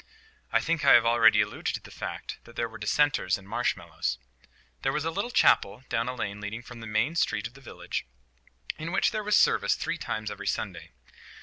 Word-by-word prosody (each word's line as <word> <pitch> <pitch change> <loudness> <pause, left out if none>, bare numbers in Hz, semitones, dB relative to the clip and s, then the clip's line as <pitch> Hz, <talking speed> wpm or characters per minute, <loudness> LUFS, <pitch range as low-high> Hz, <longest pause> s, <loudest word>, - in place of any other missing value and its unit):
I - - +4
think 165 -2 -1
I - - +7
have 115 - +7
already 115 -1 +6
alluded - - -2
to - - -4
the - - -14
fact - - -6
that 120 - -15
there 115 - -1
were 110 -1 -11
Dissenters 145 -11 +2
in 95 - -15
Marshmallows. 100 - -2 0.6
There - - +1
was 150 +2 -2
a 165 - 0
little 200 +7 -2
chapel 125 - +3
down 115 0 0
a 125 - -4
lane 105 -3 -4
leading 110 +3 -5
from 120 0 -11
the 110 - -8
main 110 +9 0
street 105 -9 +1
of 120 - -6
the 135 - -15
village, 120 - -5 0.7
in 160 +2 -4
which 190 - +2
there 215 -2 -2
was 210 0 +3
service - - +4
three - - -3
times 110 -1 -3
every 105 - -7
Sunday. - - -3
120 Hz, 210 wpm, -28 LUFS, 110-150 Hz, 0.7 s, I